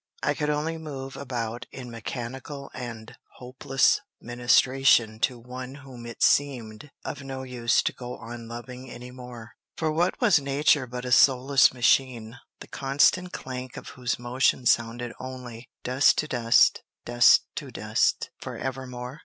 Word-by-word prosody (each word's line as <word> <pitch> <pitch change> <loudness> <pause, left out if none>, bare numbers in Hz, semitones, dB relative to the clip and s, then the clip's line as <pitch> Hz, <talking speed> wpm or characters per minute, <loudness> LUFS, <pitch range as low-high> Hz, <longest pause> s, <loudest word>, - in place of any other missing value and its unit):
I - - +2
could 150 -2 -2
only 155 +2 -1
move 135 -4 -7
about 120 -4 -4
in 125 -2 -8
mechanical 130 +4 -6
and 115 -2 -8 0.2
hopeless 130 +5 +1 0.2
ministration 120 -1 +3
to 125 +1 0
one 125 +2 -8
whom 130 -4 -11
it 115 - -4
seemed 125 -3 +1 0.2
of 140 - -5
no 135 -1 -6
use 125 -2 +1
to - - -1
go 125 -1 -7
on 115 0 -9
loving 125 +2 -8
any 125 +1 -9
more; 125 -2 -10 0.3
for 160 -1 0
what 170 +4 0
was 210 - +5
nature 140 -1 +2
but 125 +1 -6
a 125 - -4
soulless 135 +1 +5
machine, 120 -2 +1 0.2
the - - -9
constant 145 +7 +2
clank 130 -1 -7
of 125 - -8
whose 125 -2 -3
motion 125 +1 +1
sounded 120 0 +1
only, 125 -2 -8
"Dust 130 +3 +4
to 155 - 0
dust; 120 -3 +4 0.2
dust 120 0 +6
to - - -5
dust," - - 0
forevermore? 130 +1 -6
125 Hz, 145 wpm, -26 LUFS, 120-135 Hz, 0.3 s, dust